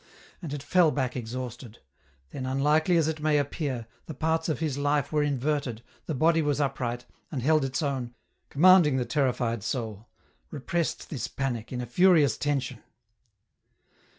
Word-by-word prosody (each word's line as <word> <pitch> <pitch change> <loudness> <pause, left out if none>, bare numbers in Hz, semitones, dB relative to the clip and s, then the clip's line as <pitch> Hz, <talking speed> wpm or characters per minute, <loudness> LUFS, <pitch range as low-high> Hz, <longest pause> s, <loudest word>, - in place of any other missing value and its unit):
And 165 -6 -6
it 145 -1 -5
fell 170 +2 +4
back 130 -4 -2
exhausted; 120 -1 -6 0.5
then 130 -2 -5
unlikely 150 +6 +2
as 160 -2 +2
it 160 -1 -3
may 150 -1 +3
appear, 140 -4 -2 0.2
the 155 - -7
parts 160 +3 0
of 155 - 0
his 155 -4 -2
life 145 -1 0
were 150 -1 +2
inverted, 140 -4 -1 0.2
the 155 - -2
body 165 +4 +3
was 145 -1 0
upright, 125 -4 -2 0.3
and 130 -5 -3
held 155 +1 +3
its 135 +4 -2
own, 130 -4 -3 0.3
commanding 165 -2 +6
the 125 - 0
terrified 125 -6 0
soul, 110 -1 -4 0.4
repressed 155 +4 -3
this 125 -6 -3
panic 120 -5 -4
in 125 -1 -3
a - - -4
furious 155 - +4
tension. 145 -2 -2
140 Hz, 155 wpm, -27 LUFS, 125-155 Hz, 0.5 s, commanding